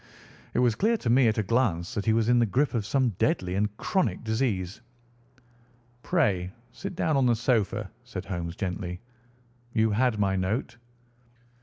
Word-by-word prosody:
It - - +1
was 120 -2 +4
clear 225 - +2
to 120 - -1
me 125 0 +5
at 110 - +1
a 110 - +1
glance 100 -6 0
that 100 - -3
he 110 - +4
was 115 0 +2
in 120 0 +4
the 120 - +4
grip 135 +7 +1
of 110 -4 -1
some 130 -1 +2
deadly 95 - +1
and 105 +2 -1
chronic 190 -9 0
disease. 110 -5 -1 1.2
"Pray 100 - +1 0.2
sit 195 +5 -7
down 160 -3 +1
on 135 -2 +3
the 120 - +4
sofa," 110 -3 0
said 115 -7 -7
Holmes 85 -2 -4
gently. 90 -1 -4 0.7
"You 110 -1 +2
had 120 +1 +2
my 100 -2 +1
note?" 110 +6 -2
110 Hz, 170 wpm, -27 LUFS, 95-125 Hz, 1.2 s, me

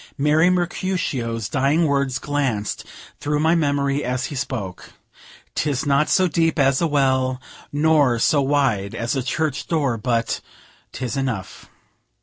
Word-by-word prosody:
Merry 155 +4 +4
Mercutio's 165 - -1
dying 145 - +2
words 140 -3 +1
glanced 135 -8 -2 0.3
through 150 0 -1
my 160 +2 +3
memory 145 -3 +1
as 125 0 -1
he 145 - -6
spoke: 120 -9 -5 0.6
"'Tis 145 -1 -1
not 145 +1 +2
so 185 -1 +4
deep 165 -1 +1
as 135 0 +3
a 170 - +3
well, 130 -3 +1 0.3
nor 145 -4 +3
so 140 +5 +3
wide 135 -8 +1
as 120 +5 -2
a 135 - 0
church 150 +5 -2
door, 140 -8 0
but 115 0 -1 0.5
'tis 130 +1 -4
enough." 125 -8 -4
140 Hz, 135 wpm, -22 LUFS, 125-150 Hz, 0.6 s, Merry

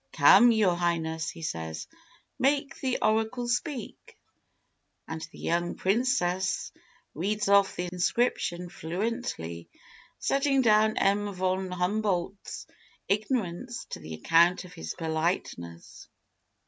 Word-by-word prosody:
"'Come, 240 0 +7
your 215 -5 +3
Highness,' 165 -2 -1
he 165 - -9
says, 80 - -4 0.5
'make 280 +1 +1
the 260 -2 0
oracle 225 +3 +1
speak.' 245 +2 -4 0.9
"And 160 0 -5
the - - -14
young 175 +1 -1
princess 195 -3 0 0.4
reads 205 +7 -1
off 200 -1 +4
the 180 - -3
inscription 180 -2 0
fluently, 170 - -4 0.5
setting 275 -1 +2
down 215 -1 +4
M. 205 +1 +2
von 185 0 -1
Humboldt's 190 +1 -2 0.4
ignorance 215 +1 -2
to - - -5
the 80 0 -7
account 170 - +3
of 180 - -13
his 80 0 -6
politeness. 160 - -3
190 Hz, 110 wpm, -28 LUFS, 170-225 Hz, 0.9 s, Come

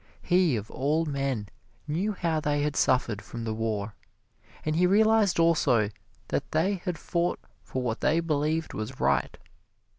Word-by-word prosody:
He, 175 -6 +3
of 105 -1 -5
all 150 +5 0
men, 135 -7 -2 0.4
knew 180 +8 -1
how 165 -4 0
they 145 -1 0
had 150 -1 -1
suffered 115 -5 +2
from 115 +2 -7
the 110 -1 -2
war 110 -1 -2 0.7
and 155 0 0
he 180 +2 +4
realized 215 0 +4
also 135 -10 +3 0.4
that - - -2
they 180 +4 +1
had 180 -3 -2
fought 170 +2 -1 0.2
for 130 - -4
what 120 -2 -2
they 155 +3 +3
believed 155 0 -1
was 110 +4 -5
right. - - +1
150 Hz, 155 wpm, -27 LUFS, 120-170 Hz, 0.7 s, he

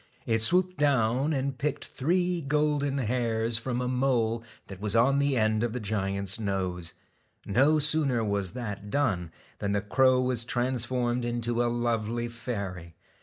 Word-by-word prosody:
It 115 -1 +1
swooped 180 +7 +4
down 135 0 +2
and 135 -2 -1
picked 145 0 -2
three 175 +4 0
golden 145 -1 0
hairs 115 -2 0
from 125 +1 -2
a - - -2
mole 125 -3 +1 0.2
that 95 -1 -10
was 105 +1 -1
on 135 +5 +4
the 140 -2 +1
end 110 0 +2
of 120 -2 -1
the 125 - -3
giant's 100 -1 -2
nose. 90 -4 -3 0.5
No 135 +9 +3
sooner 150 -5 +3
was 100 -4 -1
that 105 -4 -6
done, 100 - 0 0.3
than 100 0 -1
the 100 - +1
crow 130 +4 +3
was 125 -2 0
transformed 120 0 -1
into 120 0 -1
a 120 - +1
lovely 120 -1 -1
fairy. 100 -8 -6
120 Hz, 155 wpm, -28 LUFS, 110-135 Hz, 0.5 s, swooped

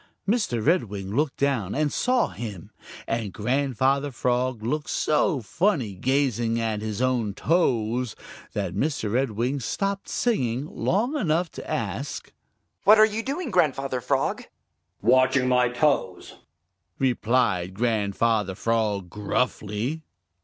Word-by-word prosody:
Mr. 195 - 0
Redwing 105 - 0
looked 150 0 0
down 130 -9 0
and 150 0 0
saw 250 -1 +2
him, 105 -8 -7 0.3
and 115 -3 -2
Grandfather 135 +4 +1
Frog 125 -2 -1
looked 150 +6 -2
so 150 -1 +1
funny 135 - 0
gazing 120 0 0
at 110 -2 -1
his 110 +2 -2
own 120 -6 0
toes 125 -8 +1 0.4
that 85 - -2
Mr. 110 -1 -1
Redwing 125 +2 0
stopped 195 - -2
singing 130 - 0
long 225 - -1
enough 170 - 0
to - - -9
ask: - - -4 0.5
"What 215 +2 +7
are 215 - +8
you 215 +1 -2
doing, 275 +3 -3
Grandfather 135 -7 +1
Frog?" 135 +2 0 0.6
"Watching 130 +1 +4
my 125 -1 +3
toes," 140 +4 0 0.6
replied 115 -8 +1
Grandfather 110 -2 +1
Frog 110 -3 0
gruffly. 105 - -2
125 Hz, 115 wpm, -25 LUFS, 110-150 Hz, 0.6 s, are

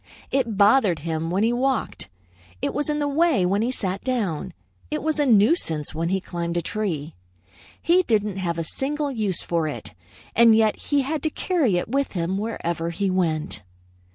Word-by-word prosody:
It 235 -6 0
bothered 205 -3 +5
him 165 0 -2
when 190 +4 +1
he 230 +2 +2
walked. 255 - -1 0.5
It - - -2
was 295 +2 -2
in 300 - 0
the 290 -1 0
way 290 - +2
when 195 +3 +1
he 235 - 0
sat 195 -6 -3
down. 215 - -2 0.4
It - - -3
was 315 0 0
a 290 - +2
nuisance 205 - +3
when 165 +2 -1
he 190 +1 +1
climbed 170 -1 -4
a - - +1
tree. 165 -7 -3 0.7
He 350 +3 +4
didn't 210 - 0
have 170 -3 -2
a 165 - -1
single 285 - -2
use 210 -8 -1
for 165 -2 0
it, 150 - -6 0.4
and 230 -1 +7
yet 220 -1 +3
he 285 -2 +3
had 300 +2 -2
to 315 - 0
carry 300 - +1
it 175 - -2
with 275 +3 -1
him 180 +1 -1
wherever 170 -6 -3
he 190 +3 -1
went. 160 - 0
210 Hz, 185 wpm, -24 LUFS, 170-270 Hz, 0.7 s, and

